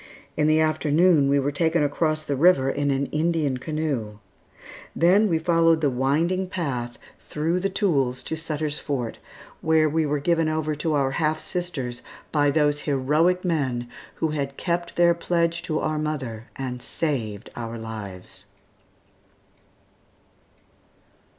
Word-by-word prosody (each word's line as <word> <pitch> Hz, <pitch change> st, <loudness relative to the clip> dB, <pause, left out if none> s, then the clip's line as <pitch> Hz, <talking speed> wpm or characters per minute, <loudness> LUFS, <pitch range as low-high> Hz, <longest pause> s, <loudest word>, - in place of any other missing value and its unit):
In 150 Hz, -1 st, +2 dB
the 155 Hz, 0 st, +4 dB
afternoon 155 Hz, 0 st, +3 dB
we 140 Hz, 0 st, +3 dB
were 140 Hz, +1 st, 0 dB
taken 165 Hz, 0 st, +1 dB
across 155 Hz, +1 st, 0 dB
the 145 Hz, -, -2 dB
river 135 Hz, -3 st, +4 dB
in 145 Hz, 0 st, -1 dB
an 140 Hz, 0 st, +1 dB
Indian 155 Hz, -4 st, 0 dB
canoe. 135 Hz, -7 st, -3 dB, 0.8 s
Then 195 Hz, +5 st, +4 dB
we 165 Hz, -, +2 dB
followed 165 Hz, 0 st, +3 dB
the 145 Hz, -3 st, +2 dB
winding 160 Hz, +9 st, +1 dB
path 125 Hz, -10 st, -3 dB, 0.2 s
through 165 Hz, +4 st, -1 dB
the 195 Hz, +2 st, 0 dB
tules 140 Hz, -, 0 dB
to 160 Hz, -, -3 dB
Sutter's 155 Hz, -2 st, -3 dB
Fort, 125 Hz, -6 st, -3 dB, 0.4 s
where 160 Hz, -1 st, +3 dB
we 155 Hz, 0 st, +1 dB
were 150 Hz, +1 st, 0 dB
given 165 Hz, +1 st, +1 dB
over 155 Hz, -1 st, -1 dB
to 150 Hz, +1 st, -1 dB
our 135 Hz, -2 st, +1 dB
half 155 Hz, +2 st, 0 dB
sisters 140 Hz, -11 st, -4 dB, 0.3 s
by 145 Hz, -2 st, +3 dB
those 145 Hz, 0 st, +2 dB
heroic 155 Hz, +7 st, +2 dB
men 130 Hz, -8 st, -1 dB, 0.3 s
who 160 Hz, -, -1 dB
had 140 Hz, -2 st, -3 dB
kept 170 Hz, -1 st, -2 dB
their 170 Hz, 0 st, +5 dB
pledge 170 Hz, 0 st, 0 dB
to 155 Hz, -, -2 dB
our 155 Hz, -1 st, -1 dB
mother 130 Hz, -8 st, -4 dB
and 125 Hz, -2 st, -5 dB
saved 115 Hz, -11 st, -3 dB
our 115 Hz, -1 st, -5 dB
lives. 105 Hz, -5 st, -8 dB
150 Hz, 140 wpm, -24 LUFS, 135-165 Hz, 0.8 s, their